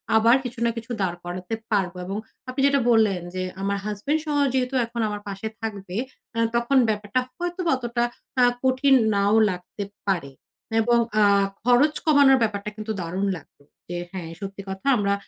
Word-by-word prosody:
আবার 230 +2 +6
কিছু 245 -1 -6
না - - +3
কিছু 230 +2 -6
দাঁড় 175 -2 -1
করাতে 180 +4 -5 0.2
পারবো 190 -4 0
এবং 195 +2 -3 0.3
আপনি 260 +2 -2
যেটা 280 0 +3
বললেন 215 -6 +3
যে, 185 - -1 0.2
আমার 200 +1 0
হাসব্যান্ডসহ 290 +9 -1 0.2
যেহেতু 260 0 0
এখন 235 0 -4
আমার 205 0 -5
পাশে 200 +2 -4
থাকবে, 200 -4 -5 0.4
আ - - +1 0.2
তখন 235 +3 +2
ব্যাপারটা 210 +2 0 0.2
হয়তোবা 350 0 -2
অতটা 240 -1 -1 0.4
আ - - +7 0.2
কঠিন 260 +1 +4 0.2
নাও 200 +1 +3 0.2
লাগতে 180 +2 -5 0.2
পারে 170 -8 0 0.5
এবং 240 +1 +3 0.2
আ - - +6 0.4
খরচ 250 +6 +4
কমানোর 285 -3 +6
ব্যাপারটা 210 -1 -2
কিন্তু 215 +1 -5
দারুণ 180 +4 -2
লাগলো। 145 -2 -18 0.3
যে, 175 - -3
হ্যাঁ, 180 -4 -6
সত্যি 195 0 -6
কথা 190 +5 -6
আমরা 200 -1 +1
215 Hz, 165 wpm, -24 LUFS, 195-255 Hz, 0.5 s, আ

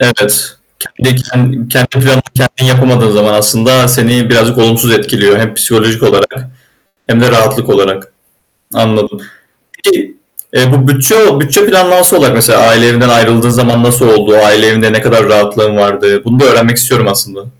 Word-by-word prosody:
Evet. 105 -3 -1 0.4
Kendi 125 -1 -2
kendi 125 0 0
planını 130 -1 0
kendin 130 0 -2
yapamadığın 125 -3 +1
zaman 105 0 0
aslında 115 +4 +1
seni 120 -1 0
birazcık 120 0 +1
olumsuz 115 +1 +1
etkiliyor 100 -1 0
hem 110 -1 -3
psikolojik 115 0 -1
olarak - - 0 0.7
hem 115 -2 0
de 125 - +2
rahatlık 110 -2 -1
olarak. 95 0 -2 0.6
Anladım. 110 - -3 0.6
Peki, 330 -6 -3 0.4
eee, 125 0 +1
bu 135 -2 +1
bütçe 140 +4 +2
bütçe 150 +7 +1
planlanması 180 -3 +2
olarak 135 -2 +1
mesela 115 +1 +2
aile 115 +1 +3
evinden 120 +1 +1
ayrıldığın 115 0 +1
zaman 120 -1 0
nasıl 120 +1 +1
oldu? 105 0 +2
Aile 105 +1 +3
evinde 110 0 0
ne 110 - 0
kadar 115 -2 +1
rahatlığın 105 0 0
vardı? 100 0 -1
Bunu 120 +2 -1
da 140 - +3
öğrenmek 115 +1 +2
istiyorum 120 -2 0
aslında. 100 0 -5
120 Hz, 155 wpm, -8 LUFS, 110-130 Hz, 0.7 s, aile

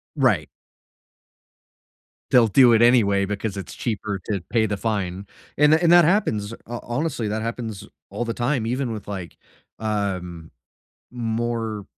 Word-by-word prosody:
Right. 105 - +2 1.8
They'll 120 -3 +6
do 120 +2 +6
it 115 - +4
anyway 100 -5 +4
because 105 0 -4
it's 85 -4 -7
cheaper 105 -3 -3
to 100 -4 -2
pay 110 -2 +2
the 100 -1 -2
fine, 100 -3 -3 0.3
and 150 +1 +5
th 160 - +3
and 170 -1 +4
that 175 -2 +7
happens. 115 - +1
Ho 120 0 -5
honestly, 125 -2 -2
that 110 +1 -2
happens 115 -3 -5 0.2
all 120 - -3
the 115 - -2
time 120 -1 0
even 125 0 -1
with, 105 -3 -7
like, 95 -4 -7 0.4
um, 95 -6 -3 0.6
more 115 -3 -3
110 Hz, 145 wpm, -23 LUFS, 100-120 Hz, 1.8 s, that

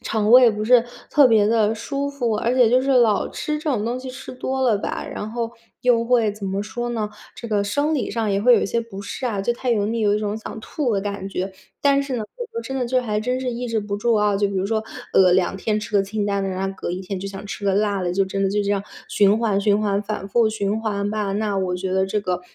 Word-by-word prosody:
肠 215 -1 0
胃 250 -2 +8
不 215 0 -3
是 245 0 +5 0.3
特 290 -2 +6
别 215 -3 +4
地 220 -1 +3
舒 280 +5 -3
服， 245 -5 -1
而 230 +3 0
且 250 -3 +5
就 255 +3 +3
是 275 - 0
老 235 -6 +3
吃 300 - -3
这 305 0 -2
种 220 -6 0
东 240 +2 -2
西 255 0 -7
吃 255 - -9
多 265 +1 -3
了 240 -5 +3
吧， 200 - -4
然 210 - -5
后 230 0 -3 0.3
又 245 -2 +3
会 235 -3 +3
怎 205 0 -8
么 195 +1 -2
说 240 +3 -4
呢？ 220 -3 -2 0.3
这 235 - -7
个 210 -2 +1
生 285 +10 0
理 275 - -1
上 225 -3 -1
也 195 0 +1
会 250 +2 +6
有 - - +3
一 - - 0
些 235 +4 0
不 225 -4 -8
适 200 +6 -6
啊， 210 -5 -1
就 220 +5 0
太 250 +1 -3
油 210 -3 +2
腻， 230 +2 -1
有 205 -1 +3
一 - - +1
种 210 0 -2
想 220 +1 -7
吐 255 +1 -2
的 200 - +1
感 200 -1 -4
觉。 190 0 -3 0.3
但 280 0 +3
是 275 -2 -4
呢， 220 - -3
我 - - -4
说 465 - -3
真 265 - -5
的 255 - 0
就 255 +1 +1
还 215 -4 -1
真 250 +3 -1
是 260 - -2
抑 245 +1 -4
制 230 -1 0
不 205 -1 -3
住 230 +3 +1
啊， 210 -1 +2
就 200 0 +1
比 200 - -5
如 190 0 0
说， 220 +1 0 0.3
呃， 185 -2 +6
2 185 +1 +2
天 210 +2 -1
吃 210 - -7
个 200 - +4
清 205 +1 -2
淡 200 -1 0
的， 195 - -1
然 190 +1 -2
后 195 - -6
隔 - - -4
1 180 +1 -3
天 190 +1 -5
就 195 - -4
想 195 0 -8
吃 200 - -6
个 195 - +2
辣 205 -1 +1
的， 175 -1 -1
就 195 +2 +2
真 195 +1 -3
的 195 - +1
就 205 +1 +1
这 200 - -1
样， 200 -1 -1 0.3
循 205 +1 +4
环 215 -4 +1
循 205 0 +2
环 205 -1 0
反 210 -2 -4
复 230 +2 +3
循 215 0 -1
环 205 -2 -2
吧， 210 -2 -2
那 205 0 -1
我 185 -1 -1
觉 185 +1 -3
得 190 0 +2
这 200 +2 -1
个 180 -3 -2
215 Hz, 305 characters per minute, -22 LUFS, 200-240 Hz, 0.3 s, 胃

